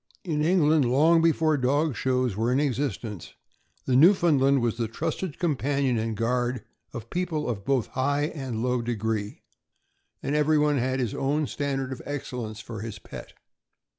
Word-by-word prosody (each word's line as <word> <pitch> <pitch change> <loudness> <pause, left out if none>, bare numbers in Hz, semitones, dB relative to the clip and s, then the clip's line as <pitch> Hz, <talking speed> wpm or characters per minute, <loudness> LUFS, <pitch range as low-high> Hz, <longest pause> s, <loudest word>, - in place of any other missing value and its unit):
In 155 -5 -1
Eng 165 0 +3
land, 155 -3 +4
long 155 +7 +4
before 160 -2 +3
dog 140 +2 +1
shows 125 -4 0
were 115 +3 0
in 130 - +2
existence, 125 - -3 0.5
the 130 - +1
New 170 +10 +7
foundland 140 -6 +3
was 115 -1 0
the 115 -2 -1
trusted 160 - -4
companion 140 -6 0
and 110 -1 -3
guard 125 +2 -1 0.3
of 115 0 -8
people 175 -4 -2
of 110 -5 -3
both 130 0 +1
high 140 +2 0
and 130 -6 -4
low 125 -1 0
decree, 110 -3 -3 0.8
and 140 - -1
everyone 150 -1 +3
had 130 +2 -1
his 120 -5 -1
own 145 +3 0
standard 135 -2 -3
of 130 - -6
excellence 125 -6 -5
for 110 -3 -7
his 110 -1 -6
pet. - - -10
135 Hz, 165 wpm, -26 LUFS, 120-150 Hz, 0.8 s, New